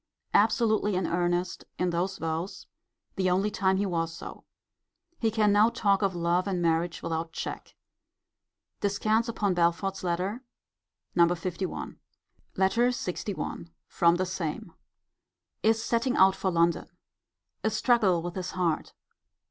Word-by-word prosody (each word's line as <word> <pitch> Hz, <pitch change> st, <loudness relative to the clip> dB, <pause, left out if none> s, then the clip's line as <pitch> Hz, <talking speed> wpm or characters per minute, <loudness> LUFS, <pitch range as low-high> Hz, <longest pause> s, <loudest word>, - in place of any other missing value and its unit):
Absolutely 215 Hz, -1 st, +3 dB
in 185 Hz, -1 st, 0 dB
earnest 175 Hz, 0 st, -1 dB
in 180 Hz, -1 st, 0 dB
those 185 Hz, +3 st, -1 dB
vows. 165 Hz, +3 st, -4 dB, 0.5 s
[The 185 Hz, -1 st, +2 dB
only 195 Hz, +4 st, +1 dB
time 190 Hz, -2 st, +1 dB
he 200 Hz, -, +1 dB
was 165 Hz, -3 st, -1 dB
so.] 165 Hz, -, -9 dB, 0.7 s
He 225 Hz, -, +2 dB
can 215 Hz, -1 st, +2 dB
now 210 Hz, +2 st, +5 dB
talk 200 Hz, -3 st, +1 dB
of 195 Hz, -2 st, +1 dB
love 175 Hz, +2 st, +1 dB
and 190 Hz, -2 st, -1 dB
marriage 170 Hz, 0 st, 0 dB
without 165 Hz, 0 st, -3 dB
check. -, -, -6 dB, 1.0 s
Descants 215 Hz, +3 st, +1 dB
upon 205 Hz, -4 st, 0 dB
Belford's 175 Hz, +3 st, 0 dB
letter, 185 Hz, +7 st, -1 dB, 0.7 s
No. 170 Hz, -, +6 dB
LI. 175 Hz, +2 st, -3 dB, 0.6 s
LETTER 230 Hz, +6 st, +3 dB
LXI. 200 Hz, -6 st, -3 dB, 0.2 s
From 170 Hz, 0 st, +3 dB
the 185 Hz, +1 st, 0 dB
same. 180 Hz, -4 st, -4 dB, 0.9 s
Is 225 Hz, 0 st, +2 dB
setting 240 Hz, +3 st, 0 dB
out 190 Hz, 0 st, +6 dB
for 190 Hz, -, -1 dB
London. 170 Hz, -1 st, +1 dB, 0.8 s
A 220 Hz, -, +2 dB
struggle 210 Hz, -8 st, +2 dB
with 175 Hz, 0 st, -4 dB
his 185 Hz, -1 st, -4 dB
heart. 175 Hz, -4 st, -1 dB
185 Hz, 130 wpm, -28 LUFS, 170-205 Hz, 1.0 s, No